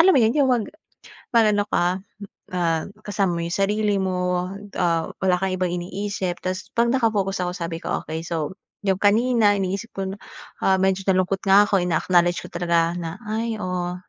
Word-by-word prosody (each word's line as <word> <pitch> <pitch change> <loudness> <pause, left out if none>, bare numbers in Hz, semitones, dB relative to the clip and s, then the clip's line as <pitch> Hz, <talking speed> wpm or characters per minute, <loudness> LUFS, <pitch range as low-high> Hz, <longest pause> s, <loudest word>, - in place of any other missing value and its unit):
alam 375 +3 +7
mo - - +5
yun? 225 +1 +4
Yung 275 -2 +4
mag 235 -3 +1 0.7
mag-ano 210 -3 +4
ka 180 +2 +1 0.6
ah, 165 -3 +1 0.2
kasama 195 -4 0
mo - - -2
yung 170 - -2
sarili 205 +1 +1
mo, 180 -1 -1 0.3
ah, 165 -2 +1 0.2
wala 185 -1 +4
kang 190 -1 0
ibang 180 -1 -1
iniisip 185 0 -3
tas 185 +1 -3
pag 235 0 +3
naka-focus 205 -6 +1
ako 180 - -2
sabi 165 -1 -4
ko, - - -2
okey 160 +1 -4
so, 160 -4 -2 0.3
yung 190 -1 +1
kanina 215 0 +4
iniisip 195 +4 -3
ko 195 -1 -3
na, 200 - -9 0.5
ah, 190 - +4
medyo 190 0 +1
nalungkot 185 +1 +2
nga 195 +1 +7
ako 195 - +2
ina 170 -3 +1
acknowledge 175 -1 +3
ko - - -9
talaga 170 -1 +1
na, 165 0 -5
ay 225 +1 -1
oo 180 -2 -2
190 Hz, 185 wpm, -23 LUFS, 175-205 Hz, 0.7 s, alam